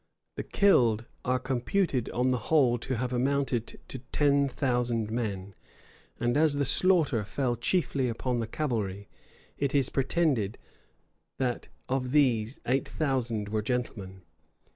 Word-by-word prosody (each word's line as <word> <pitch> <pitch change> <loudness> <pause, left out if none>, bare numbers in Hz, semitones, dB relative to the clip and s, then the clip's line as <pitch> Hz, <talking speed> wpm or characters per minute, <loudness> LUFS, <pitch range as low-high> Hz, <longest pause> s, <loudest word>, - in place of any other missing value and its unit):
The - - -4
killed 120 - +3 0.2
are 125 +1 +1
computed 130 - -1
on 125 +1 0
the 125 - 0
whole 130 -7 +3
to 130 +3 -3
have 125 +1 -2
amounted 130 -2 -1
to 130 - -6
ten 140 -1 +2
thousand 120 -5 -1
men; 100 -4 -3 0.7
and 120 0 0
as 150 -1 +3
the 140 0 +1
slaughter 150 - +5
fell 125 +3 -1
chiefly 140 -5 0
upon 120 +1 -2
the 115 - -2
cavalry, 105 -8 -3 0.5
it 140 0 -1
is 135 -3 +3
pretended 135 - 0 0.8
that, 125 -2 -2 0.2
of 130 -1 -1
these, 125 -5 +2
eight 130 +3 0
thousand 120 -8 -1
were 110 0 -1
gentlemen. 100 -6 -4
125 Hz, 135 wpm, -28 LUFS, 115-140 Hz, 0.8 s, slaughter